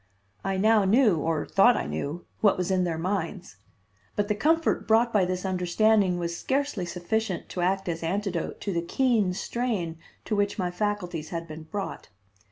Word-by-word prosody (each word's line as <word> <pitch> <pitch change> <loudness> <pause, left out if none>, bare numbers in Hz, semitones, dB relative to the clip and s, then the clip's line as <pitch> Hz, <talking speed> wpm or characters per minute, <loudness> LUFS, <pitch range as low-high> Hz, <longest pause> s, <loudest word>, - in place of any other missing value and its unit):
I 195 0 -1
now 215 +1 +4
knew, 210 -1 +4
or 160 0 -1
thought 235 +5 +5
I - - -2
knew, 155 +5 -4
what 205 - +4
was 180 +1 -1
in 185 -1 +2
their 165 -2 -2
minds; 185 - -3 0.6
but 205 0 0
the - - +3
comfort 320 +10 +1
brought 230 +2 +4
by 200 -4 +4
this 185 +1 -3
understanding 190 +1 +2
was 170 -1 -3
scarcely 265 -6 -1
sufficient 185 +2 -2
to 180 - -4
act 190 +2 0
as 165 -1 -2
antidote 185 0 -2
to 200 - -2
the 170 - 0
keen 210 -1 +1
strain 195 -9 -2 0.3
to 215 - -1
which 205 +1 0
my 180 -3 -1
faculties 180 -5 -2
had 165 -1 -4
been 155 0 -9
brought. 200 +2 -5
190 Hz, 175 wpm, -27 LUFS, 175-215 Hz, 0.6 s, thought